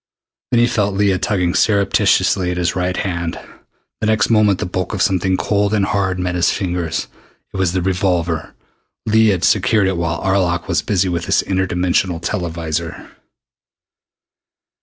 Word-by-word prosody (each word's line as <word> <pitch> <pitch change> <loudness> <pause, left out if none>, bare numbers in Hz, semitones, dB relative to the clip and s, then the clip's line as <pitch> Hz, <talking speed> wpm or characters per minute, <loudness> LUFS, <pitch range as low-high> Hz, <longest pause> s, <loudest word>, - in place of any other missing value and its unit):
Then 120 - +2
he 120 - +5
felt 105 -5 0
Leah 100 -2 +2
tugging 90 -3 0
surreptitiously 100 -3 +2
at 90 - -3
his 85 -1 0
right 90 0 -1
hand. 85 -3 -3 0.6
The 105 - -1
next 110 0 +2
moment 105 -3 +4
the - - -3
bulk 90 +3 -3
of 95 - -3
something 95 0 +1
cold 105 +1 0
and 100 -2 +2
hard 95 -1 -1
met 90 0 -2
his 90 -1 +2
fingers. 90 -4 -2 0.5
It - - -5
was 95 -2 0
the 95 -2 -1
revolver. 90 -3 -1 0.5
Leah 110 -1 +4
had 90 -1 -3
secured 105 +1 +3
it 95 -2 -1
while 85 0 -2
Arlok 90 -3 0
was - - +1
busy 95 -1 0
with 85 -1 -2
his - - +2
inter 95 -1 -1
dimensional 90 -1 0
televisor. 85 -3 -4
95 Hz, 160 wpm, -18 LUFS, 85-100 Hz, 0.6 s, he